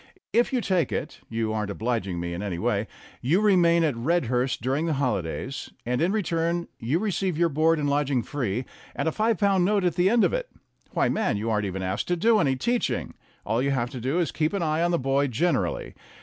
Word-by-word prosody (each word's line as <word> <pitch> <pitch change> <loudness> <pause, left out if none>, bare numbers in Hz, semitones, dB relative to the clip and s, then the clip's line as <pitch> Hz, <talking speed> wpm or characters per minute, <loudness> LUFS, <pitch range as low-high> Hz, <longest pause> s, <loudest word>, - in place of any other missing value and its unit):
If 240 +1 +3
you 255 -2 +1
take 180 - +1
it - - -4
you 115 -1 -1
aren't 105 -2 -2
obliging 100 -4 -2
me 85 0 -3
in 85 - -4
any 100 -4 -3
way 85 - 0 0.3
you 155 +10 +2
remain 175 -5 +4
at 155 -3 +2
Redhurst 125 -2 0
during 135 +7 -1
the 160 - +1
holidays, 125 - -2 0.2
and 125 +3 0
in 175 +3 +2
return 170 -4 0
you 125 +8 0
receive 190 -3 -1
your 170 0 +3
board 160 +2 +3
and 145 -1 -1
lodging 140 -3 +1
free 125 -3 -2 0.3
and - - -1
a - - +2
five 220 +5 +1
pound 195 -3 +3
note 200 +1 +2
at 175 -2 +2
the 180 +3 +3
end 235 +1 +4
of - - +2
it. - - -2 0.4
Why, - - +1
man, 215 - 0
you 110 +2 -2
aren't 105 -2 0
even 95 0 -4
asked 95 +2 -2
to 180 - +1
do 220 +5 +3
any 135 -7 +2
teaching; 240 - -1 0.3
all 110 +3 +1
you 140 - +1
have 125 -3 -1
to 125 - -6
do 135 +7 0
is 175 -2 +1
to - - -11
keep 155 +3 +2
an 195 -3 0
eye 155 0 +1
on 175 - +2
the 170 - +2
boy 135 0 +1
gener 140 +4 +1
ally. - - -5
145 Hz, 235 wpm, -26 LUFS, 120-175 Hz, 0.4 s, remain